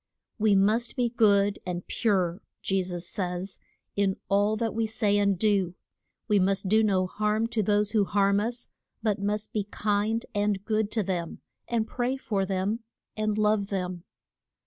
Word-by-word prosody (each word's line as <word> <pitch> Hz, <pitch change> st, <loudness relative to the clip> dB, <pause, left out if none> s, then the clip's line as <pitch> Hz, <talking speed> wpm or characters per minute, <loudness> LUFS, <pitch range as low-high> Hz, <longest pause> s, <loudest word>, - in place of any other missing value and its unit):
We 210 Hz, -1 st, +4 dB
must 215 Hz, +5 st, +2 dB
be 245 Hz, -1 st, +1 dB
good 205 Hz, -4 st, +3 dB
and 180 Hz, -1 st, -4 dB
pure, 190 Hz, -4 st, 0 dB, 0.2 s
Je 195 Hz, 0 st, +1 dB
sus 180 Hz, -1 st, -4 dB
says, 180 Hz, 0 st, -3 dB, 0.4 s
in 195 Hz, -1 st, +1 dB
all 205 Hz, +2 st, +3 dB
that 225 Hz, 0 st, -1 dB
we 225 Hz, 0 st, 0 dB
say 210 Hz, -2 st, +1 dB
and 200 Hz, -2 st, +2 dB
do: 195 Hz, -3 st, +1 dB, 0.5 s
we 210 Hz, -2 st, +4 dB
must 195 Hz, +1 st, +1 dB
do 215 Hz, +3 st, +4 dB
no 195 Hz, -4 st, +2 dB
harm 210 Hz, +3 st, 0 dB
to 225 Hz, -, 0 dB
those 205 Hz, 0 st, +2 dB
who 210 Hz, -3 st, +3 dB
harm 200 Hz, 0 st, +2 dB
us, 240 Hz, +3 st, -2 dB, 0.3 s
but 210 Hz, -3 st, 0 dB
must 210 Hz, +1 st, -2 dB
be 210 Hz, -2 st, -1 dB
kind 210 Hz, +2 st, 0 dB
and 205 Hz, -1 st, 0 dB
good 215 Hz, -2 st, +1 dB
to 220 Hz, -, +1 dB
them, 175 Hz, -3 st, -3 dB, 0.3 s
and 230 Hz, -2 st, 0 dB
pray 250 Hz, +3 st, -2 dB
for 200 Hz, -7 st, -1 dB
them, 195 Hz, +4 st, -1 dB, 0.4 s
and 215 Hz, -1 st, -1 dB
love 210 Hz, -1 st, +2 dB
them. 180 Hz, -3 st, -3 dB
205 Hz, 170 wpm, -27 LUFS, 195-215 Hz, 0.5 s, We